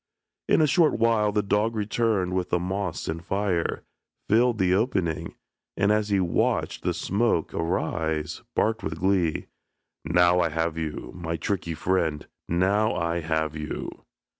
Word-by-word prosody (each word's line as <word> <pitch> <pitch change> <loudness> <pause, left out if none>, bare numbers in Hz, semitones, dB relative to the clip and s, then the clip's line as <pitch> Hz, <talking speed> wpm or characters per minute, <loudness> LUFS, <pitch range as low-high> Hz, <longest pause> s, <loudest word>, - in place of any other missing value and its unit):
In - - +5
a 155 - +4
short 160 +2 +3
while 110 -2 +3
the 105 0 +1
dog 105 +3 +1
returned 105 -3 0
with 90 -1 -1
the - - +2
moss 90 0 -3
and 80 +1 -4
fire, 95 -2 -1 0.4
filled 120 +2 +3
the 95 -2 +2
opening, 95 -6 0 0.4
and, 100 +1 +3
as 105 0 +1
he 100 -1 +2
watched 85 -3 0
the - - 0
smoke 100 -5 0
arise, 80 -2 -2
barked 115 +1 +1
with 80 0 -4
glee, 95 -4 +1 0.6
"Now 90 +3 +4
I 85 - +2
have 80 +1 -1
you, 80 -2 -4
my 85 -2 -4
tricky 85 0 -2
friend, 80 -3 0 0.2
now 100 +6 +2
I 85 +1 -1
have 80 -1 -1
you." 75 -1 -4
90 Hz, 150 wpm, -26 LUFS, 80-105 Hz, 0.6 s, In